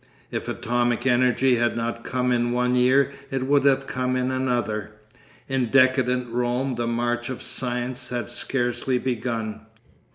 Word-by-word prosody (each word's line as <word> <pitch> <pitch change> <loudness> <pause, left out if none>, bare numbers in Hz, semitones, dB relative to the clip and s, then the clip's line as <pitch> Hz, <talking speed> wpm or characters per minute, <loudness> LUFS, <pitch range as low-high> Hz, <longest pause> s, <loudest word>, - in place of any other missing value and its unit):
If - - -4
atomic 120 0 0
energy 125 0 +3
had 120 0 +1
not 115 0 -3
come 125 0 -1
in 120 -1 +1
one 125 0 +1
year 130 +2 +4 0.2
it 135 -1 -2
would 140 0 +3
have 135 -1 +3
come 130 -1 -1
in 130 0 0
another. 120 -5 -1 0.5
In 135 -2 0
decadent 130 -1 +3
Rome 125 +2 0
the 120 -1 -2
march 120 +1 -1
of 130 - -5
science 125 0 -2
had 120 -3 -3
scarcely 120 +1 -1
begun.... 115 -3 -3
125 Hz, 150 wpm, -24 LUFS, 120-130 Hz, 0.5 s, year